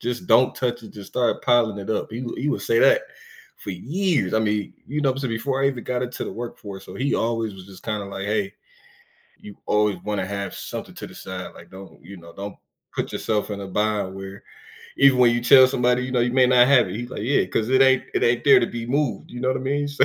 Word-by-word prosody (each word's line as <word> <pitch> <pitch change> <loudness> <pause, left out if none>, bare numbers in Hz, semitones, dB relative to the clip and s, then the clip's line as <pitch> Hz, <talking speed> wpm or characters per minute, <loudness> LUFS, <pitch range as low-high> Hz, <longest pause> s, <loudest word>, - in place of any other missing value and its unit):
just 125 +8 -4
don't 130 -6 +4
touch 120 -2 -2
it, - - -12
just 100 -2 -11
start 120 -2 0
piling 115 -4 +3
it 100 - -6
up," 110 - -1
he 115 +3 -5
would 120 - -6
he 145 - -1
would 100 - -1
say 115 +4 +2
that - - +5 0.5
for 100 - -7
years, 140 - -1
I 110 - +3
mean, 105 -2 -1
you 150 +3 -3
know, 135 -3 +2
I'm - - -10
saying 135 -3 -3
before 135 +4 -1
I 135 - +4
even 125 -3 -5
got 125 0 -2
into 125 0 -4
the - - -6
workforce, 100 -5 -8
so - - -10
he 135 +2 0
always 115 -2 -1
was 95 - -11
just 95 -1 -14
kinda 105 -2 -3
like, 100 0 -6
"Hey, 105 -2 -1 0.9
you 105 - -12
always 105 -2 +2
wanna 105 -3 -2
have 100 -1 -4
something - - -7
to - - -8
the - - -14
side, - - -7
like - - -15
don't, 95 -6 -13
you 95 +3 -11
know, 85 -1 -14
don't 100 0 -7 0.4
put - - -3
yourself 105 -1 -1
in 100 - -5
a 100 - -6
bind 105 -1 -1
where 95 0 -9 0.5
even 135 -2 +5
when 120 -1 +5
you 120 - -1
tell 130 +1 +8
somebody, 125 -1 +1
you 130 - -5
know, 125 - +2
you 120 0 +1
may 130 -1 +5
not 125 0 +5
have 140 -3 +5
it," - - -6
he's 120 +1 -6
like, - - -5
"Yeah, 135 +6 +2
'cause 110 +1 -1
it 130 +1 +5
ain't 130 -1 +4
it - - 0
ain't 120 0 +2
there 140 - +7
to - - +1
be 115 0 -6
moved," 140 +1 -1
you 120 - -7
know 130 - 0
what 130 - +1
I - - -7
mean, 145 +2 -1
so 145 -1 +2
120 Hz, 260 wpm, -23 LUFS, 100-130 Hz, 0.9 s, tell